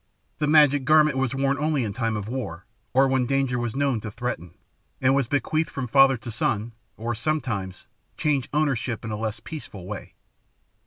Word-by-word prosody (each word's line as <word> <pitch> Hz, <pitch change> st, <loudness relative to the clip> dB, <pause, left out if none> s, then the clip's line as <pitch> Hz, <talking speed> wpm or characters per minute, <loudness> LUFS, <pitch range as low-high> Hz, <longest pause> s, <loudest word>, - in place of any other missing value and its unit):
The 150 Hz, -, +1 dB
magic 145 Hz, -2 st, +5 dB
garment 155 Hz, 0 st, +5 dB
was 135 Hz, -1 st, 0 dB
worn 135 Hz, +1 st, +1 dB
only 150 Hz, -3 st, +1 dB
in 105 Hz, -3 st, -3 dB
time 115 Hz, -1 st, -1 dB
of 105 Hz, -1 st, -5 dB
war, 110 Hz, -9 st, -5 dB, 0.3 s
or 135 Hz, +1 st, +4 dB
when 130 Hz, -2 st, +1 dB
danger 135 Hz, -2 st, +1 dB
was 120 Hz, -1 st, -3 dB
known 135 Hz, -4 st, +1 dB
to 105 Hz, -, -6 dB
threaten, 110 Hz, -7 st, -5 dB, 0.4 s
and 130 Hz, 0 st, +3 dB
was 135 Hz, -3 st, +2 dB
bequeathed 155 Hz, +5 st, 0 dB
from 135 Hz, -, -4 dB
father 135 Hz, +1 st, +5 dB
to 120 Hz, 0 st, -8 dB
son, 110 Hz, 0 st, -1 dB, 0.3 s
or, 115 Hz, +2 st, -2 dB
sometimes, 115 Hz, -, -2 dB, 0.3 s
changed 145 Hz, -3 st, 0 dB
ownership 130 Hz, -6 st, 0 dB
in 110 Hz, -, -4 dB
a -, -, -1 dB
less 110 Hz, 0 st, -3 dB
peaceful 105 Hz, -, -8 dB
way. 100 Hz, +1 st, -7 dB
130 Hz, 180 wpm, -25 LUFS, 110-140 Hz, 0.4 s, magic